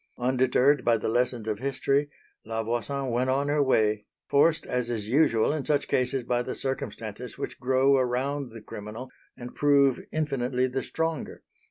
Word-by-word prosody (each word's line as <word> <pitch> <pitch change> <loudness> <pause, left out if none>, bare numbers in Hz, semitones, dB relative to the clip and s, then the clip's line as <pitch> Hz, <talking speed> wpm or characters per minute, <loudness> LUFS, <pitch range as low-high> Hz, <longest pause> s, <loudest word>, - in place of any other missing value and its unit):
Undeterred 130 +3 +2
by 115 -1 +3
the 110 - -3
lessons 120 -1 0
of 105 -1 -2
history, 140 +2 0 0.3
La 110 0 -3
Voisin 125 +4 -2
went 125 +2 0
on 140 +2 +1
her 145 0 +2
way, 110 -6 +2 0.2
forced 155 +3 +3
as 125 -1 -2
is 110 -4 -3
usual 130 -1 +3
in 155 -3 -2
such 145 +1 0
cases 125 0 0
by 120 0 0
the - - -4
circumstances 125 -3 -5
which - - -5
grow 130 +2 +3
around 130 +2 -1
the 115 -1 -11
criminal 110 +6 -8 0.3
and 125 -1 -8
prove 140 -2 +3
infinitely 130 -5 0
the 130 +1 -2
stronger. 160 -2 -3
130 Hz, 165 wpm, -27 LUFS, 120-140 Hz, 0.3 s, by